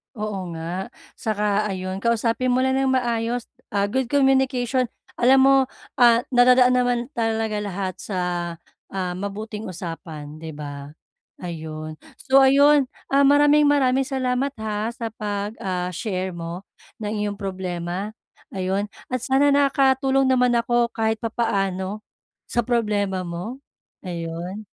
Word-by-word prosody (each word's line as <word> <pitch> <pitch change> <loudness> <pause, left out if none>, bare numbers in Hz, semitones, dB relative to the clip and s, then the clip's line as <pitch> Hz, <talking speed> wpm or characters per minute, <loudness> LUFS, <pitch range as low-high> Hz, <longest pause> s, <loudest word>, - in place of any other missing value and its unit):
Oo 210 -4 -4
nga. 170 +4 -4 0.3
Saka 210 -1 0
ayun 185 -1 -3
kausapin 235 +3 0
mo 255 - +2
lang 265 0 +2
ng 270 - +1
maayos, 235 -1 -1 0.2
ah, 200 0 +1
good 260 +3 0
communication. 265 -2 +2 0.3
Alam 260 +2 +5
mo, 275 +1 +6 0.4
ah, 235 -1 +6
nadadaan 250 0 +6
naman 245 -1 +2 0.2
talaga 225 -1 0
lahat 195 -2 -3
sa, 195 -3 -4 0.8
ah, 185 -2 -2
mabuting 210 +2 -5
usapan, 165 -4 -7
'di 160 -1 -8
ba? 145 0 -8 0.5
Ayun, 155 -2 -6 0.2
so 270 0 +3
ayun, 280 +1 +6 0.2
ah, 280 +1 +5
maraming 290 +1 +5
maraming 270 -2 +3
salamat 260 0 -1
ha 215 -2 -3
sa 230 -1 -4
'pag, 205 0 -4
ah, 180 -1 -2
share 185 0 -3
mo 170 +1 -6 0.4
ng 210 - -2 0.2
iyong 205 - -2
problema, 185 +1 -4 0.4
ayun 190 +2 -1 0.2
at 255 - 0
sana 270 +3 +3
nakatulong 270 -1 +3
naman 250 -1 +3
ako 235 0 +1
kahit 220 -1 0
papaano 205 -3 -2 0.4
sa 240 - 0
problema 205 -6 0
mo, 180 +9 -5 0.5
ayun. 175 +4 -5
220 Hz, 130 wpm, -23 LUFS, 185-255 Hz, 0.8 s, mo